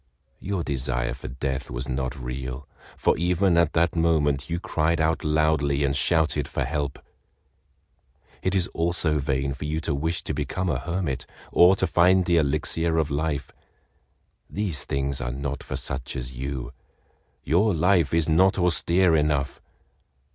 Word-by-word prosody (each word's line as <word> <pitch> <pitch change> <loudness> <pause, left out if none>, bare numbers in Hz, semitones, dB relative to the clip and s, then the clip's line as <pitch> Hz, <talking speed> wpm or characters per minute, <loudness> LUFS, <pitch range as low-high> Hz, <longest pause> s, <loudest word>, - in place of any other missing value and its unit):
Your 95 -3 -3
desire 65 -3 -1
for - - -8
death 65 +2 -4
was - - -4
not 65 0 -3
real, 65 +2 -6 0.3
for - - +2
even 90 +1 +2
at 85 -2 +3
that 85 +2 +2
moment 75 -4 +1
you 85 +1 -1
cried 85 -1 0
out 80 +1 +1
loudly 75 -2 +1
and 70 -1 +1
shouted 75 -1 +2
for - - -2
help." 70 +1 -2 1.4
"It 95 - 0
is 95 -3 +2
also 80 -2 0
vain 70 -1 -1
for 70 +2 -7
you 75 +1 -1
to - - -2
wish 80 +5 -2
to - - -3
become 75 +6 -2
a - - 0
hermit, 85 -7 -3 0.2
or 90 +2 +6
to 95 - 0
find 90 +1 +4
the 85 -1 +3
Elixir 80 +2 0
of 75 -2 0
Life. 75 -1 -2 1.0
These 85 -11 -1
things 70 0 -2
are - - -2
not 70 +2 -4
for - - -6
such 70 -1 -4
as 65 -1 -4
you—your 65 - -3
life 85 -1 +3
is 80 -1 +1
not 90 +4 +4
austere 90 0 +3
enough. 75 -3 0
75 Hz, 155 wpm, -25 LUFS, 70-85 Hz, 1.4 s, or